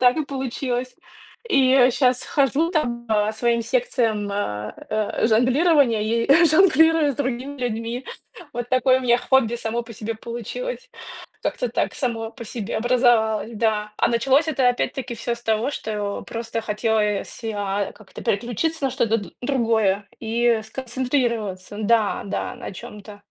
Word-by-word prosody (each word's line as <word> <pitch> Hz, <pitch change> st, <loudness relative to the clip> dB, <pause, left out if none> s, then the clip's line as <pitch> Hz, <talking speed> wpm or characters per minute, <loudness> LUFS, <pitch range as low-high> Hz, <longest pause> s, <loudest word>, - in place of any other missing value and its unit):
так 250 Hz, +2 st, +5 dB
и 310 Hz, -, 0 dB
получилось. 255 Hz, -2 st, -3 dB, 0.5 s
И 260 Hz, -, +5 dB
щас 250 Hz, -1 st, +2 dB
хожу 285 Hz, +4 st, +1 dB
там 240 Hz, -7 st, -1 dB
по 215 Hz, -1 st, +2 dB
своим 235 Hz, +1 st, +1 dB
секциям 230 Hz, -, 0 dB
а, 105 Hz, -, -3 dB, 0.2 s
а, 215 Hz, +1 st, 0 dB
жонглирования 255 Hz, +1 st, +3 dB
и 235 Hz, +10 st, +4 dB
жонглирую 320 Hz, -3 st, +5 dB
с -, -, -9 dB
другими 270 Hz, +1 st, -3 dB
людьми. 235 Hz, +1 st, -3 dB, 0.5 s
Вот 240 Hz, 0 st, -4 dB
такое 255 Hz, 0 st, +3 dB
у -, -, -6 dB
меня 240 Hz, -1 st, +4 dB
хобби 245 Hz, -3 st, +2 dB
само 235 Hz, 0 st, -2 dB
по 230 Hz, 0 st, -11 dB
себе 225 Hz, +1 st, -4 dB
получилось. -, -, -6 dB, 0.5 s
Как-то -, -, -1 dB
так -, -, -1 dB
само 225 Hz, -4 st, -3 dB
по 235 Hz, -3 st, -9 dB
себе 220 Hz, -2 st, -4 dB
образовалось, 235 Hz, -2 st, +2 dB
да. 210 Hz, -1 st, 0 dB
А -, -, +2 dB
началось 270 Hz, +6 st, +2 dB
это 260 Hz, -4 st, +3 dB
опять-таки 245 Hz, 0 st, -2 dB
всё 235 Hz, +1 st, -3 dB
с 235 Hz, -, -16 dB
того, 225 Hz, +4 st, 0 dB
что 210 Hz, -5 st, -4 dB
просто 230 Hz, 0 st, -4 dB
хотелось 210 Hz, -1 st, 0 dB
си 225 Hz, -1 st, -5 dB
а 200 Hz, 0 st, -2 dB
как-то 205 Hz, -1 st, -12 dB
переключиться 245 Hz, +10 st, -1 dB
на 265 Hz, -, +2 dB
что-то 230 Hz, -3 st, +1 dB
д 200 Hz, -, -8 dB
другое 225 Hz, -6 st, +1 dB
и 230 Hz, 0 st, +1 dB
сконцентрироваться 235 Hz, -5 st, -2 dB
да, 220 Hz, -1 st, +2 dB
да, 250 Hz, -, -3 dB
на 240 Hz, -, -7 dB
чём-то. 205 Hz, +2 st, -11 dB
235 Hz, 150 wpm, -23 LUFS, 220-260 Hz, 0.5 s, так